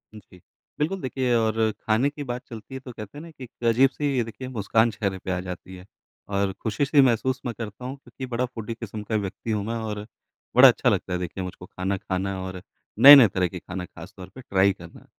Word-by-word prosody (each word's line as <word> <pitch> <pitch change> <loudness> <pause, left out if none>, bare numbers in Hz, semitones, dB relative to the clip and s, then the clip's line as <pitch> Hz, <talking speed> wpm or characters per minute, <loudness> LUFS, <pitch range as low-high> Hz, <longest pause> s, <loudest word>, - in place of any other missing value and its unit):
जी। 95 -3 -15 0.4
बिल्कुल 180 +6 -1
देखिए, 130 -1 -1
और 110 -1 +2
ख़ाने 110 +5 0
की 145 0 -7
बात 125 -2 -4
चलती 115 +2 -10
है 130 - -5
तो 130 -1 -10
कहते 110 +2 -10
हैं - - -7
ना 165 - -11
कि 135 -4 -12
एक 120 -1 -14
अजीब-सी 135 +2 +2
देखिए 115 +3 -8
मुस्कान 115 -1 +1
चेहरे 100 -2 -2
पे 95 - -5
आ 90 - -1
जाती 90 0 -8
है 90 0 -12 0.4
और 100 -1 0
ख़ुशी-सी 140 +6 +3
महसूस 130 +1 +2
मैं 120 - -2
करता 110 +1 -7
हूँ 130 +2 -5
क्योंकि 135 -1 -9
बड़ा 125 +2 +1
फ़ूडी 115 -2 -6
किस्म 110 -2 -7
का 110 +1 -3
व्यक्ति 105 +2 -3
हूँ 105 -2 -1
मैं 115 +2 -3
और 105 -2 -4 0.5
बड़ा - - +10
अच्छा - - +3
लगता 95 - -1
है 90 - -1
देखिए 90 +1 -5
मुझको 90 0 -8
ख़ाना 95 +2 -3
ख़ाना 95 +1 -3
और 95 -1 -6 0.4
नए-नए 140 -3 +11
तरह 95 -1 0
के 90 +1 -8
ख़ाना 90 +1 -6
ख़ास 90 +4 -12
तौर 95 -1 -10
पर 130 - -9
ट्राई 100 -3 +2
करना। 85 -2 -14
110 Hz, 220 wpm, -25 LUFS, 95-125 Hz, 0.5 s, नए-नए